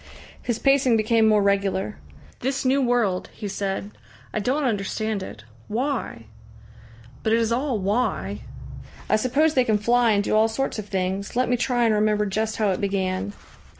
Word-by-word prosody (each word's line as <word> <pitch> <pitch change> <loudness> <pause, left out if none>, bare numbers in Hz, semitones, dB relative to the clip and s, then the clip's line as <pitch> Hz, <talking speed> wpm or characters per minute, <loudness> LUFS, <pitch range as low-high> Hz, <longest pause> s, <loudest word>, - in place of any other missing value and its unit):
His 240 -3 -2
pacing 275 -3 +3
became 220 +1 +3
more 210 -2 +4
regular. 200 0 0 0.4
"This 265 +2 -2
new 270 +2 +3
world," 240 -7 +1
he 210 - -6
said. 195 - -3 0.4
"I - - 0
don't 260 +8 0
understand 215 -2 -1
it. 110 - -8 0.2
Why?... 240 - -3 1.0
But 220 - +1
it 230 - +4
is 230 0 0
all 255 0 0
why!" 205 +6 -1 0.7
"I - - +3
suppose 275 +8 +2
they 255 - +4
can 220 -3 +2
fly 235 +2 +3
and 200 0 +2
do - - 0
all 220 +1 +5
sorts 225 +1 -2
of 210 - -6
things. 190 +1 -2
Let 250 0 +1
me 245 - +3
try 245 0 +1
and 225 - +3
remember 210 0 +2
just 215 +2 -2
how 210 -3 +2
it 185 - -2
began." 195 0 -1
220 Hz, 175 wpm, -24 LUFS, 200-245 Hz, 1.0 s, all